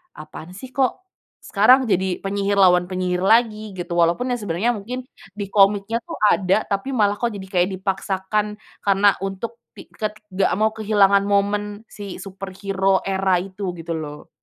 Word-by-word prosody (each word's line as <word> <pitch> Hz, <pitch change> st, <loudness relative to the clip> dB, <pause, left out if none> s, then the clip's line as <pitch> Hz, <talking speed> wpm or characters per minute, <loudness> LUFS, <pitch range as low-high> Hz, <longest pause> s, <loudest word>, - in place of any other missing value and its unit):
"Apaan, 155 Hz, +3 st, -10 dB
sih, 255 Hz, +6 st, -10 dB
kok, 270 Hz, +7 st, 0 dB, 0.4 s
sekarang 250 Hz, +6 st, +5 dB
jadi 190 Hz, -2 st, 0 dB
penyihir 200 Hz, +1 st, -1 dB
lawan 180 Hz, -2 st, +5 dB
penyihir 180 Hz, -1 st, -1 dB
lagi." 215 Hz, -2 st, +2 dB
Gitu. 175 Hz, -1 st, -6 dB
Walaupun 170 Hz, +9 st, +2 dB
yang 245 Hz, -, -1 dB
sebenarnya 205 Hz, +3 st, 0 dB
mungkin 250 Hz, +6 st, -6 dB, 0.3 s
di 200 Hz, -1 st, -6 dB
komiknya, 205 Hz, +3 st, +3 dB
tuh, 335 Hz, -1 st, -6 dB, 0.2 s
ada 190 Hz, +2 st, +2 dB
tapi 205 Hz, +7 st, -3 dB
malah, 205 Hz, -3 st, +2 dB
kok, 240 Hz, -, +1 dB
jadi 195 Hz, -, -7 dB, 0.2 s
kayak 180 Hz, +2 st, +3 dB
dipaksakan 195 Hz, +2 st, -2 dB, 0.3 s
karena 200 Hz, 0 st, +4 dB
untuk 195 Hz, +5 st, -5 dB, 0.2 s
ti -, -, -13 dB
ke 215 Hz, -, -2 dB, 0.2 s
nggak 190 Hz, +1 st, +1 dB
mau 215 Hz, +3 st, +2 dB
kehilangan 200 Hz, -2 st, +3 dB
momen 205 Hz, +1 st, 0 dB
si 200 Hz, -2 st, -7 dB
superhero 195 Hz, 0 st, -2 dB
era 190 Hz, -1 st, +1 dB
itu 190 Hz, -1 st, -5 dB
gitu, 170 Hz, 0 st, -7 dB
loh. 150 Hz, -2 st, -6 dB
200 Hz, 160 wpm, -22 LUFS, 190-210 Hz, 0.4 s, sekarang